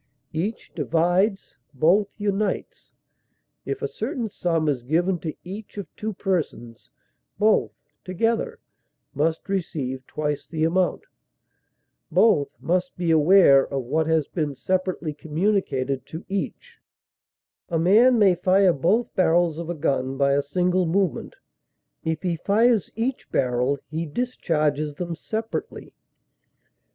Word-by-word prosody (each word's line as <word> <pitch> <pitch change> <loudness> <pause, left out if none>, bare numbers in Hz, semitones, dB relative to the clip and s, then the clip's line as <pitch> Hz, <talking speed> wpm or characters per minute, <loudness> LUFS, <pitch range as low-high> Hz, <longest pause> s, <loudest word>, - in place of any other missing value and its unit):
Each 190 +8 -4
divides, 175 - 0 0.2
both 180 +9 +3
unites; 205 0 -2 0.7
if 415 +2 -4
a - - +1
certain 265 - -4
sum 165 -5 -1
is 140 -4 0
given 170 +8 0
to 160 -2 -5
each 200 +4 -9
of 200 - -7
two 215 0 -4
persons, 165 - -3 0.5
both 215 +1 +3 0.3
(together) 230 - -1 0.6
must 160 +3 -1
receive 145 -9 -3
twice 150 -1 -3
the 155 +1 -2
amount; 180 +3 +1 1.1
both 180 -11 +4
must 180 +1 -1
be 175 -2 0
aware 155 -3 +6
of 135 -2 -3
what 155 +6 0
has 160 -3 +2
been 150 -5 -3
separately 185 0 -2
communicated 150 -5 -1
to 160 +3 -8
each; 455 - -5 0.9
a 170 - 0
man 220 +9 +5
may 200 -4 +5
fire 185 +1 +3
both 185 - +1
barrels 170 -2 +2
of 170 0 -5
a 175 - -2
gun 135 -3 -1
by 140 0 +3
a 140 - +3
single 180 +5 0
movement; 185 0 -1 0.7
if 160 -1 -2
he 175 -2 -1
fires 220 +4 +2
each 245 +4 -3
barrel, 125 +1 +1
he 160 +1 -4
discharges 150 - -1
them 170 +1 -4
separately. 220 +6 -5
175 Hz, 125 wpm, -24 LUFS, 150-200 Hz, 1.1 s, aware